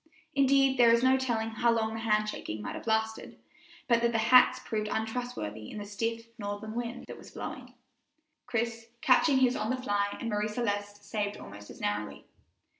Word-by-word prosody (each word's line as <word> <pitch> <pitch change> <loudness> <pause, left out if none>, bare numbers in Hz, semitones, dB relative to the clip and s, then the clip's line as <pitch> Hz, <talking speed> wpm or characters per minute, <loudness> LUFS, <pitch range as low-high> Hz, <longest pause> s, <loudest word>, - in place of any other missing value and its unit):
Indeed, 270 -1 +4
there 235 -1 +7
is 235 +1 +4
no 260 0 +5
telling 235 -4 -1
how 235 +2 +1
long 220 -1 0
the 225 - -4
hand 215 -1 +1
shaking 110 - -5
might 100 -1 -5
have - - -8
lasted 220 0 -1 0.5
but 235 -1 +3
that 235 0 +2
the 230 - +1
hats 250 +3 +6
proved 215 -1 -3
untrustworthy 220 - -4
in - - -8
the 205 - -5
stiff 230 +3 -3
northern 205 +1 -5
wind 240 +1 -4
that - - -9
was - - -12
blowing, 255 -1 -8 0.7
Chris 230 -1 -2
catching 265 +2 +4
his 255 -1 +3
on 215 -3 -2
the 255 - 0
fly 205 -5 -1
and 235 - -4
Marie 210 -1 0
Celeste's 205 -2 -3
saved 205 -1 -2
almost 100 +1 -11
as - - -11
narrowly. 105 0 -3
225 Hz, 190 wpm, -30 LUFS, 205-245 Hz, 0.7 s, there